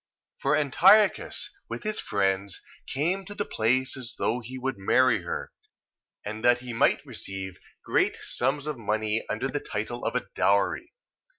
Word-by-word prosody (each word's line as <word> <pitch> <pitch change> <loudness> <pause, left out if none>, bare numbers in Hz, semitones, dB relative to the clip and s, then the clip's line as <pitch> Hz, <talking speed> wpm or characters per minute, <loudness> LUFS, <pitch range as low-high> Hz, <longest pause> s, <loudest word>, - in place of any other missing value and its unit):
For 140 +2 +2
Antiochus, 195 - +4 0.2
with - - -5
his 215 -1 -1
friends, 95 -1 0 0.3
came 175 +8 0
to 205 - -9
the 205 0 -2
place 130 +4 +1
as 125 -4 -4
though 120 - 0
he 125 +2 -8
would 130 -4 -3
marry 115 +2 +3
her, 85 - -5 0.7
and 110 +2 -5
that 120 0 +6
he 125 -1 -7
might 115 - +2
receive 95 -1 -6 0.3
great - - +2
sums 135 +3 -1
of 150 -5 -4
money 110 0 0
under - - -1
the - - -2
title - - -4
of - - -1
a - - 0
dowry. 100 - +1
125 Hz, 160 wpm, -27 LUFS, 105-145 Hz, 0.7 s, that